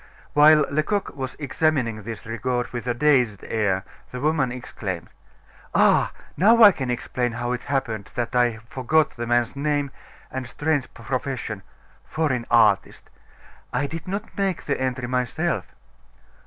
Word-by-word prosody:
While 150 Hz, 0 st, +7 dB
Lecoq 170 Hz, +7 st, -1 dB
was 130 Hz, -2 st, -5 dB
examining 135 Hz, -6 st, 0 dB
this 115 Hz, +2 st, -7 dB
record 120 Hz, +2 st, -2 dB
with 120 Hz, 0 st, -5 dB
a 120 Hz, -, +2 dB
dazed 125 Hz, -6 st, +2 dB
air, 100 Hz, -4 st, 0 dB, 0.3 s
the 125 Hz, -, -6 dB
woman 145 Hz, -3 st, +1 dB
exclaimed: 95 Hz, -8 st, -5 dB, 0.7 s
"Ah! -, -, +4 dB, 0.2 s
now 225 Hz, +5 st, +6 dB
I 205 Hz, -, +11 dB
can 130 Hz, -8 st, -4 dB
explain 120 Hz, 0 st, -1 dB
how 120 Hz, +1 st, -2 dB
it 125 Hz, -, -3 dB
happened 120 Hz, -7 st, -2 dB
that 120 Hz, +1 st, -2 dB
I 120 Hz, -2 st, +3 dB
forgot 140 Hz, +5 st, +1 dB
the 120 Hz, 0 st, -4 dB
man's 120 Hz, +2 st, +1 dB
name 145 Hz, -1 st, 0 dB, 0.4 s
and 130 Hz, -1 st, -4 dB
strange 145 Hz, 0 st, -1 dB
profession 115 Hz, -3 st, -4 dB, 0.4 s
'foreign 130 Hz, -7 st, -1 dB
artist.' 110 Hz, -4 st, +3 dB, 0.6 s
I 145 Hz, -, 0 dB
did 165 Hz, +4 st, -6 dB
not 200 Hz, +4 st, -5 dB
make 195 Hz, -3 st, -1 dB
the 140 Hz, -, -1 dB
entry 130 Hz, -1 st, -1 dB
myself." 125 Hz, -, -1 dB
130 Hz, 140 wpm, -24 LUFS, 120-150 Hz, 0.7 s, I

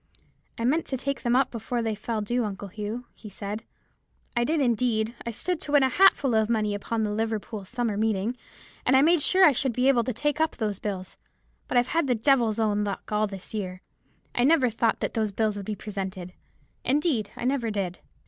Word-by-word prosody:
'I 230 Hz, -, -2 dB
meant 310 Hz, +7 st, +1 dB
to 265 Hz, -, -2 dB
take 275 Hz, +2 st, -3 dB
them 240 Hz, -1 st, +1 dB
up 265 Hz, -, +3 dB
before 235 Hz, +1 st, -3 dB
they 225 Hz, -1 st, 0 dB
fell 215 Hz, +1 st, -3 dB
due, 240 Hz, +4 st, 0 dB
Uncle 200 Hz, -1 st, -5 dB
Hugh,' 215 Hz, +5 st, -5 dB
he 215 Hz, -, -11 dB
said. 205 Hz, +2 st, -5 dB, 0.7 s
'I 240 Hz, 0 st, +2 dB
did, 315 Hz, +4 st, +1 dB
indeed; 235 Hz, -3 st, +1 dB
I -, -, 0 dB
stood 340 Hz, -, -2 dB
to 290 Hz, -, -2 dB
win 290 Hz, -2 st, +6 dB
a 265 Hz, -, +3 dB
hatful 290 Hz, -7 st, +4 dB
of 220 Hz, 0 st, +2 dB
money 215 Hz, -3 st, +1 dB
upon 220 Hz, +2 st, -2 dB
the 210 Hz, -, -1 dB
Liverpool 220 Hz, -1 st, -3 dB
Summer 235 Hz, 0 st, -2 dB
Meeting, 220 Hz, +1 st, 0 dB, 0.5 s
and 260 Hz, -, +3 dB
I 270 Hz, -, +5 dB
made 335 Hz, +1 st, +4 dB
sure 370 Hz, +5 st, +6 dB
I 305 Hz, -, +7 dB
should 265 Hz, -1 st, 0 dB
be 250 Hz, +3 st, +2 dB
able 245 Hz, -4 st, +4 dB
to 255 Hz, -, -1 dB
take 295 Hz, +6 st, -1 dB
up 320 Hz, -, +1 dB
those 210 Hz, -4 st, -2 dB
bills: 190 Hz, -3 st, -5 dB, 0.5 s
but 250 Hz, -, 0 dB
I've 245 Hz, 0 st, +3 dB
had 330 Hz, -3 st, +1 dB
the 250 Hz, -, +2 dB
devil's 230 Hz, -2 st, +2 dB
own 210 Hz, -2 st, +1 dB
luck 200 Hz, 0 st, -5 dB
all 210 Hz, 0 st, +2 dB
this 195 Hz, 0 st, -8 dB
year. 185 Hz, -3 st, -4 dB, 0.5 s
I 240 Hz, -, +1 dB
never 270 Hz, -3 st, +4 dB
thought 230 Hz, +1 st, 0 dB
those 220 Hz, -3 st, -1 dB
bills 215 Hz, +1 st, 0 dB
would 200 Hz, -1 st, -6 dB
be 215 Hz, -, -2 dB
presented; 190 Hz, -4 st, -6 dB, 0.5 s
indeed, 275 Hz, -, +1 dB
I -, -, -4 dB
never 255 Hz, -3 st, 0 dB
did.' 195 Hz, -4 st, -3 dB
225 Hz, 215 wpm, -26 LUFS, 210-255 Hz, 0.7 s, I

